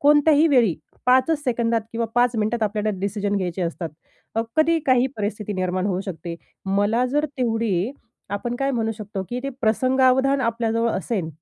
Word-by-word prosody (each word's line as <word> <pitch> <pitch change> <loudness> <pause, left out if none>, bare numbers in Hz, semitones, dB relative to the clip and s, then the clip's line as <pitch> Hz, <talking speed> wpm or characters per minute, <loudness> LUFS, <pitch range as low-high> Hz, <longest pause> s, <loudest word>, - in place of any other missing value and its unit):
कोणत्याही 295 +1 +5
वेळी 240 - +4 0.3
5 255 +1 +5
च 320 - +4
सेकंदात 235 -2 +1
किंवा 230 0 -1
5 245 0 +3
मिनिटात 220 +1 0
आपल्याला 210 0 0
डिसिजन 205 +1 -1
घ्यायचे 180 -1 -2
असतात. 170 0 -3 0.5
अ, 225 - +1
कधी 325 +1 +4
काही 255 -1 +4
परिस्थिती 210 0 -3
निर्माण 185 0 -1
होऊ 190 -2 0
शकते. 170 -1 -5 0.3
मला 205 +5 +2
जर 295 +4 +1
तेवढी 225 -3 0 0.4
आपण 235 +4 -3
काय 275 +1 0
म्हणू 225 -4 0
शकतो 210 -2 -5
की 245 +1 -3
ते 275 - -2
प्रसंगावधान 260 +4 +3
आपल्याजवळ 230 -1 0
असेन, 190 -3 -2
225 Hz, 165 wpm, -23 LUFS, 205-255 Hz, 0.5 s, कोणत्याही